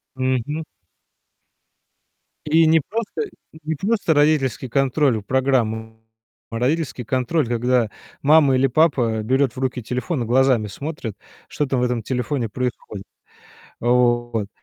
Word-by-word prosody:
Мгм. 130 +4 -1 1.8
И 160 +2 +4
не 160 +1 +5
просто 230 - -4
н 415 - -7 0.3
не 160 +1 -2
просто 200 +1 +1
родительский 145 -4 +2
контроль 135 -1 +2
в 100 - -12
программу, 110 -4 0 0.5
а 115 0 -4
родительский 135 -1 -1
контроль, 130 +5 0
когда 120 -1 +1 0.3
мама 145 -2 +5
или 135 +1 +3
папа 125 -6 +2
берет 130 +2 +1
в - - -6
руки 130 -2 -2
телефон 125 +4 -2
и - - -4
глазами 125 -2 +3
смотрит, 130 -2 -6 0.3
что 150 - -1
там 130 -2 -1
в - - +1
этом 125 -2 -1
телефоне 125 +1 -2
происходит. 120 -4 -4 0.8
Вот. 120 -3 +1
130 Hz, 130 wpm, -21 LUFS, 120-145 Hz, 1.8 s, не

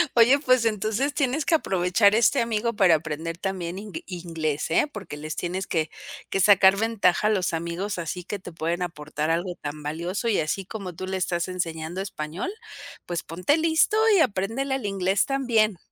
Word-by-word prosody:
Oye, 245 +4 +6
pues 255 -4 +3
entonces 220 +6 0
tienes 280 +1 0
que 330 - +4
aprovechar 195 - +3
este 240 +4 +4
amigo 230 0 0
para 185 -5 +5
aprender 160 +2 -4
también 185 -1 -4
ing 210 +1 -9
inglés, 165 -5 -3
¿eh? 290 - +3
Porque 200 - -8
les 155 0 -5
tienes 180 +2 -3
que 160 -2 0 0.4
que - - -1
sacar 195 0 +6
ventaja 210 -3 +2
a - - +3
los 190 -4 0
amigos, 170 +4 -3
así 175 +2 -4
que 205 +1 -4
te 185 - -9
pueden 170 +2 -2
aportar 155 -3 -3
algo 175 +2 -1
tan 150 +1 -5
valioso, 170 +9 -3
y 220 - +2
así 170 +5 -2
como 190 -3 -6
tú 185 - -6
le 190 - -2
estás 175 -1 -1
enseñando 170 -1 -4
español, 180 - -4 0.5
pues 175 -1 -3
ponte 180 - 0
listo 320 +6 +3 0.2
y - - +4
apréndele 235 +4 0
el 265 -6 -4
inglés 195 0 +1
también. 235 -7 +1
190 Hz, 180 wpm, -25 LUFS, 170-220 Hz, 0.5 s, Oye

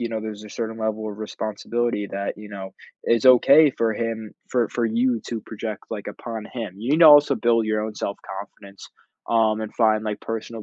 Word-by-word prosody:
you 120 - -2
know, 110 -1 -3
there's 110 -1 -7
a 105 - -11
certain 110 0 -4
level 110 0 -2
of 105 - -9
responsibility 110 0 -3
that, 100 0 -3
you 105 0 -11
know, 95 -2 -8 0.3
is 115 +2 +2
okay 140 +4 +7
for 115 -3 0
him 110 -1 -4 0.2
for 120 -3 +1
for 120 - -1
you 115 +1 +1
to 115 -2 -3
project, 110 -1 -6
like, 105 -3 -5
upon 115 -3 -7
him. 115 -7 -5
You 115 +6 -4
need 155 - +3
to 165 - +9
also 145 -2 +8
build 115 -2 +2
your 110 0 0
own 110 0 -5
self 100 - -4 0.2
confidence, 100 -1 -13 0.4
um, 110 -1 +2
and 110 -1 -5
find, 110 -2 +3
like, 105 -1 -3
personal 115 0 -5
110 Hz, 210 wpm, -23 LUFS, 105-115 Hz, 0.4 s, to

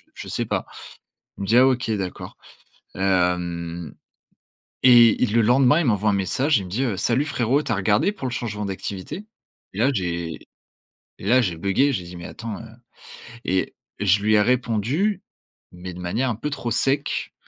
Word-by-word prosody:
je - - -8
sais - - -2
pas». - - -2 0.7
Il - - -5
me - - -3
dit: 115 +4 +3
«Ah 130 - +7
OK 125 -3 0
d'accord» 95 -3 -5 0.6
hem 90 -3 -1 0.9
et 120 -3 +7
et 125 - +5
le 115 +2 +2
lendemain, 130 +6 +4
il 165 - 0
m'envoie 105 -2 +2
un - - +1
message, 120 - +1
il 100 - -5
me - - -11
dit, 125 +8 -1
heu: 110 -6 -1
«Salut 120 +8 +1
frérot, 140 -1 +1
tu - - -2
as 110 - +1
regardé 105 - +2
pour 140 -11 -6
le - - -6
changement 105 -4 -4
d'activité?» 95 - -6 0.5
et - - -7
là 130 +5 +3
j'ai 85 -5 -3 0.9
et 95 - -7
là 130 +3 +5
j'ai 90 -7 -1
buggé, 130 +11 +2
j'ai 90 - -3
dit: 90 +1 -10
«Mais 85 - -9
attends, 110 -3 -7
heu» 115 - -10 0.8
et 95 0 -1 0.2
je 100 0 +3
lui 110 0 +3
ai 105 - +5
répondu, 125 - 0 0.5
mais 90 0 -8
de 90 - -10
manière 115 +9 -1
un 115 - -1
peu 150 +7 -4
trop 120 -5 -4
sec, 135 +4 0
110 Hz, 190 wpm, -23 LUFS, 95-125 Hz, 0.9 s, Ah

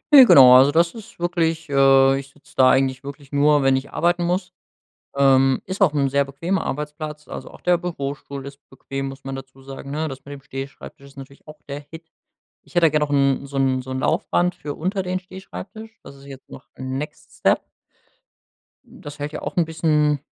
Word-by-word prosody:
Ne, 270 -2 +11
genau, 130 - +9
also 130 +3 +7
das 170 +2 +2
ist 225 0 -12
wirklich 165 -2 -1
äh, 135 0 +5
ich 135 0 -10
sitz 140 +1 -23
da 130 -1 +5
eigentlich 130 0 +1
wirklich 140 0 -10
nur, 145 0 +3
wenn 135 0 +4
ich 130 +1 -4
arbeiten 175 +1 +1
muss. 180 +1 -2 0.6
Ähm, 135 -1 +4
ist 190 +2 -6
auch 175 -7 +4
'n 140 -2 +1
sehr 140 0 +1
bequemer 165 +8 -2
Arbeitsplatz, 150 +1 -5
also - - -8
auch - - -16
der 175 -1 +3
Bürostuhl 140 -5 -6
ist 140 0 -10
bequem, 135 0 -6
muss 135 0 -11
man 135 0 -5
dazu 135 0 -11
sagen, 135 0 -9
ne? 155 +2 -2
Das 135 -2 -7
mit 145 - -7
dem 140 - -12
Stehschreibtisch 135 +1 -9
ist 140 - -18
natürlich 140 +2 -13
auch 150 - -12
der 140 +1 -5
Hit. 165 0 -11 0.6
Ich - - -21
hätte 175 -1 +4
da - - +3
gern 150 0 0
noch 150 -1 -1
'n 140 -1 +2
so 140 0 -7
'n 130 -1 +1
so 130 - -8
'n 130 - -3
Laufband 175 +3 0
für 150 -5 -6
unter 190 +4 -2
den 185 0 -2
Stehschreibtisch. 200 +4 -11
Das 140 - -13
ist 135 0 -16
jetzt 135 -1 -12
noch 130 - -12
next 150 +4 -7
step. - - +2 1.2
Das 145 0 -11
hält 145 +1 -4
ja - - -6
auch - - -5
'n 175 - +2
bisschen, 155 -2 +1
145 Hz, 210 wpm, -22 LUFS, 135-165 Hz, 1.2 s, Ne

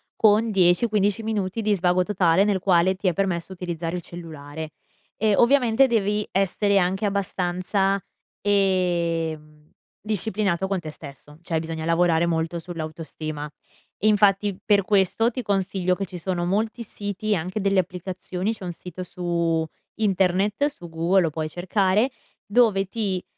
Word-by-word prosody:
con 220 +1 +4
10-15 200 +3 +2
minuti 215 -1 -2
di 210 -1 +2
svago 180 0 +2
totale, 185 -1 +3
nel 200 -2 +1
quale 185 0 +3
ti 190 0 -3
è - - -1
permesso 180 -1 -1
utilizzare 175 -2 -4
il - - -5
cellulare 160 -2 -8 0.5
e, 215 -2 +2
ovviamente, 250 0 +4
devi 210 -2 +1
essere 195 +1 +2
anche 190 +2 +1
abbastanza, 195 0 0 0.4
ehm, 170 -6 0 0.3
disciplinato 205 -3 -1
con 195 -2 -1
te 160 - -7
stesso, 150 0 -12
cioè 165 -2 -1
bisogna 160 0 -5
lavorare 170 0 +3
molto 165 0 -1
sull'autostima, 155 -2 -6 0.5
infatti 205 -2 +3
per 205 -2 +3
questo 205 +4 +2
ti 255 - -4
consiglio 190 -2 0
che 195 - -3
ci 180 0 -9
sono 175 0 -2
molti 220 +5 -1
siti 205 0 -4
e - - +4
anche 185 +5 -3
delle 195 -1 +2
applicazioni, 185 +2 -3
c'è 210 - -12
un 180 - -3
sito 180 +1 -8
su 170 -2 -1 0.3
internet, 195 +3 +1
su 175 -12 -9
Google 170 +4 +2
lo 165 - +1
puoi 155 0 -4
cercare, 190 - +1 0.3
dove 205 -2 +3
ti 195 -3 -2
185 Hz, 145 wpm, -24 LUFS, 170-205 Hz, 0.5 s, con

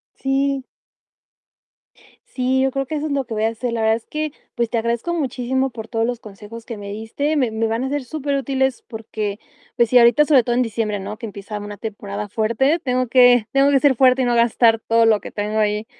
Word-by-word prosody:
Sí. 270 0 0 1.6
Sí, 260 0 0
yo 265 0 +1
creo 275 0 -3
que 310 - -4
eso 300 0 -2
es 305 - -3
lo 275 -1 -1
que 230 - -7
voy 215 - -1
a 225 - +3
hacer. 230 +1 -4
La 230 - -2
verdad 220 0 +3
es 230 - -15
que, 305 -1 -3 0.2
pues, 235 -2 -1
te 235 - -1
agradezco 235 +9 -2
muchísimo 265 -3 -1
por 225 -3 -9
todos 225 0 -1
los 245 0 -3
consejos 215 +2 -11
que 230 - -7
me 200 -1 -7
diste, 225 +9 -2
me 255 -6 +1
me 220 +1 -1
van 225 +3 -1
a 265 - -2
ser 285 -1 -2
superútiles 270 -2 -1
porque, 215 -2 -5 0.4
pues 235 -1 +2
sí, 250 +1 +6
ahorita, 240 +6 +5
sobre 280 -5 +5
todo 240 +1 -1
en 250 - +3
diciembre, 215 -3 -2
¿no? 210 +3 -6
Que 230 - -6
empieza 205 +1 -7
una 205 0 -8
temporada 205 -1 -6
fuerte, 235 - +1
tengo 255 -4 -1
que 245 -2 +5
tengo 275 +1 +4
que 275 - +4
ser 280 -1 +3
fuerte 255 +1 +4
y - - +1
no 240 -1 +1
gastar 235 -1 +3
todo 230 0 +2
lo 220 -2 +4
que - - -9
tengo 210 +1 -2
ahí, 210 0 0
235 Hz, 230 wpm, -20 LUFS, 220-265 Hz, 1.6 s, sí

